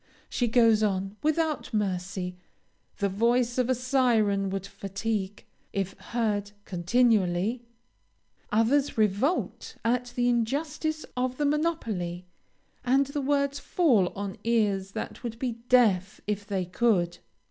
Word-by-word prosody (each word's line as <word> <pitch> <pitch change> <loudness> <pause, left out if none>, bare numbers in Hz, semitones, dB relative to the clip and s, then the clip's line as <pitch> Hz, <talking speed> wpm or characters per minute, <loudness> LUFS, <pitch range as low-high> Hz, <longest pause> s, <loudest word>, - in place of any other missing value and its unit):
She 245 - 0
goes 225 -2 +4
on, 195 -1 0
without 310 0 0
mercy; 185 -2 -2 0.6
the 200 - +1
voice 235 +5 +1
of 250 0 +1
a 255 - +3
syren 230 -6 +2
would 195 0 -3
fatigue, 200 0 -4 0.3
if 195 -1 -2
heard 210 -4 -2
continually. 200 +2 +2 0.9
Others 245 +7 +2
revolt 215 - 0
at 245 +1 +1
the 245 0 +2
injustice 295 +6 -1
of 255 0 -1
the 295 - 0
monopoly, 225 - -1 0.6
and 265 +3 +3
the 280 +1 -3
words 280 0 +1
fall 255 - +3
on 200 -1 -4
ears 205 -4 +1
that - - -5
would 230 -1 -4
be 235 -2 -3
deaf 200 -7 +3
if 205 -1 -3
they 190 -3 -1
could. 180 -2 +1
225 Hz, 125 wpm, -27 LUFS, 195-255 Hz, 0.9 s, goes